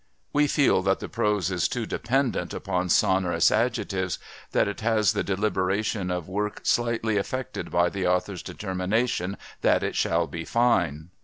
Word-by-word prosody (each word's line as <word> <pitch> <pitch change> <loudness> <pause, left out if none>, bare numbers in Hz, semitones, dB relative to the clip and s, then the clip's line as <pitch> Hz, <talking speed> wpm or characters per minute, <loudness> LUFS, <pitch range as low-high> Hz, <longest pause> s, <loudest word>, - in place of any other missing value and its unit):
We 150 0 +4
feel 140 -9 +3
that 95 +1 +1
the - - -5
prose 105 -5 0
is 90 -1 +1
too 120 -2 -3
dependent 125 +3 -1
upon 90 0 -2
sonorous 95 -2 +3
adjectives, 105 -6 0 0.3
that - - +2
it 100 - -4
has 110 -1 +2
the 105 - -1
deliberation 100 0 0
of 90 -2 -3
work 105 +3 -3
slightly 115 -2 +1
affected 130 +6 -3
by 85 0 +2
the 95 -2 -2
author's 90 +1 0
determination 95 0 -2 0.2
that - - +3
it - - -2
shall - - +1
be 80 -1 -6
fine. 90 -9 +1
100 Hz, 155 wpm, -26 LUFS, 90-115 Hz, 0.3 s, We